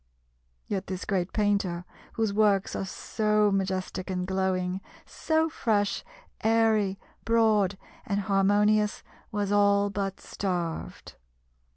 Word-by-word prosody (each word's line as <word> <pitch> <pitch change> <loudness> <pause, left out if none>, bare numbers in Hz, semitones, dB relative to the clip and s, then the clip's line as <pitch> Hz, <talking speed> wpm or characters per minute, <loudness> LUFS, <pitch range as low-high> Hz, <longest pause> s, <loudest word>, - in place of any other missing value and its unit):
Yet 195 -2 -3
this 185 -1 -4
great 185 -2 -1
painter, 200 -4 0 0.3
whose 220 -3 0
works 205 -2 +2
are - - -2
so 210 +1 +1
majestic 190 -1 -2
and 180 -1 -2
glowing, 190 0 -1 0.2
so 320 0 0
fresh, 215 -9 0 0.4
airy, 220 -3 +3 0.3
broad, 215 -4 +3 0.3
and 200 -1 0
harmonious, 205 +2 +2 0.3
was 205 -1 -1
all 200 0 +3
but 195 -1 -3
starved. 175 -4 -4
200 Hz, 105 wpm, -27 LUFS, 190-210 Hz, 0.4 s, airy